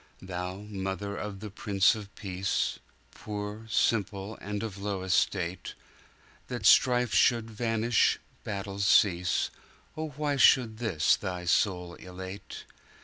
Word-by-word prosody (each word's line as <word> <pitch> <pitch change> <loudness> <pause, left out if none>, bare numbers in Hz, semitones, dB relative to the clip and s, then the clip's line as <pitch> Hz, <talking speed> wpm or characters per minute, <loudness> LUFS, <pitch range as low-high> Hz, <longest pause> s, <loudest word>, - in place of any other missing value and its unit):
Thou 90 +1 -5
mother 100 0 -4
of 100 -2 -6
the 105 -2 -7
Prince 100 -1 +3
of 105 -2 -7
Peace, 95 -1 -2 0.3
Poor, 105 +1 -6
simple, 105 -2 0
and 105 +1 -4
of 105 -3 -5
low 100 -2 -3
estate, 95 -1 0 0.7
That - - -5
strife 125 -1 +5
should 115 -2 +3
vanish, 115 0 +2 0.3
battle 100 -1 -5
cease,O 95 - +1
why 145 -2 0
should 115 -4 +5
this 100 -10 +2
thy 90 -3 -5
soul 90 -2 +1
elate? 95 +2 -9
100 Hz, 115 wpm, -29 LUFS, 95-110 Hz, 0.7 s, strife